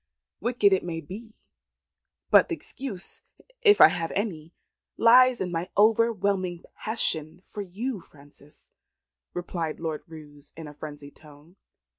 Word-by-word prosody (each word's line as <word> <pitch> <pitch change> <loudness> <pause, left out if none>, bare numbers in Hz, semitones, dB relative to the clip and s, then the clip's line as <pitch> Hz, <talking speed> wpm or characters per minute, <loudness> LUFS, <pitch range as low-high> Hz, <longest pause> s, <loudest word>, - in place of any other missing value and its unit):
"Wicked 230 -5 +2
it 190 - +1
may 170 -2 -4
be; 215 +8 -10 1.0
but - - +7
the 340 - -2
excuse 250 - -5 0.4
if 425 -3 +6
I - - +10
have 170 -2 -3
any 170 -6 -3 0.5
lies 250 +2 +6
in 180 -1 -3
my 170 +1 -3
overwhelming 200 -5 +2
passion 165 -7 0
for 210 - -7
you, 205 +5 -4
Frances," 145 -1 -17 0.6
replied 170 -3 -4
Lord 160 -2 -4
Roos 150 -3 -13
in 160 -2 -8
a 150 - -10
frenzied 145 -1 -10
tone. 150 +3 -18
180 Hz, 130 wpm, -26 LUFS, 155-220 Hz, 1.0 s, I